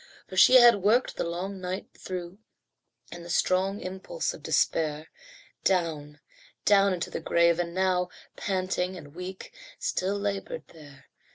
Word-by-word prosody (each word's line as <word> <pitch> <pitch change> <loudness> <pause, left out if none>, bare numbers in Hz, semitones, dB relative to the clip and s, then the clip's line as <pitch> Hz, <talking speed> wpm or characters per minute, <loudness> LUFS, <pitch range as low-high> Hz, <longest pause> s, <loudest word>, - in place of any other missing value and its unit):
For 185 - -10
she 250 +7 +7
had 240 -5 +8
worked 225 +6 +2
the - - -2
long 185 +3 -4
night 185 +1 -4
through, 180 +1 -7 0.7
In 175 - -8
the 170 - -10
strong 190 +3 +1
impulse 190 - -4
of - - -11
despair, 155 -1 0 0.5
Down, 155 -5 -1 0.5
down 200 -1 +5
into 175 -2 -4
the - - -4
grave 170 +1 +3
and 170 -1 -1
now, 185 -1 +1 0.3
Panting 185 -1 -2
and 145 -4 -12
weak, 180 +2 -8 0.2
still 200 - -1
laboured 205 - -4
there. 145 -5 -15
185 Hz, 145 wpm, -27 LUFS, 170-195 Hz, 0.7 s, had